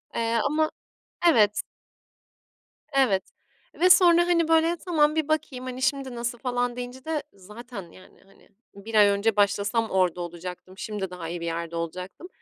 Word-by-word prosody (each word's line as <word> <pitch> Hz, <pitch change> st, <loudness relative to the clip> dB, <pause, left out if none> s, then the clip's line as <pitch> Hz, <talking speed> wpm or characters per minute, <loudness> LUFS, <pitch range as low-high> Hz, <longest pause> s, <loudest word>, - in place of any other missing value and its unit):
eee, 230 Hz, 0 st, +1 dB
ama 310 Hz, +2 st, +1 dB, 0.6 s
evet. 210 Hz, -8 st, +4 dB, 1.3 s
Evet, 235 Hz, -9 st, +3 dB, 0.6 s
ve 365 Hz, +1 st, +5 dB
sonra 345 Hz, -1 st, +6 dB
hani, 335 Hz, -2 st, +2 dB
böyle 325 Hz, +1 st, +3 dB
tamam, 305 Hz, -3 st, +2 dB
bir 315 Hz, -2 st, 0 dB
bakayım 270 Hz, -5 st, -2 dB
hani, 255 Hz, 0 st, -6 dB
şimdi 275 Hz, -2 st, -1 dB
nasıl 235 Hz, 0 st, -3 dB
falan 245 Hz, -1 st, -1 dB
deyince 250 Hz, +1 st, -7 dB
de 315 Hz, -3 st, -2 dB
zaten 205 Hz, -1 st, -10 dB
yani 185 Hz, -, -18 dB
hani, 195 Hz, -, -23 dB, 0.3 s
1 215 Hz, +3 st, -8 dB
ay 205 Hz, -1 st, +7 dB
önce 200 Hz, +2 st, +1 dB
başlasam 205 Hz, +2 st, +1 dB
orada 180 Hz, -2 st, +1 dB
olacaktım, 180 Hz, +2 st, -8 dB
şimdi 210 Hz, -5 st, -4 dB
daha 180 Hz, -2 st, -7 dB
iyi 175 Hz, 0 st, -5 dB
bir 170 Hz, -, -4 dB
yerde 170 Hz, 0 st, -4 dB
olacaktım. 180 Hz, -, -6 dB
230 Hz, 155 wpm, -25 LUFS, 190-280 Hz, 1.3 s, ay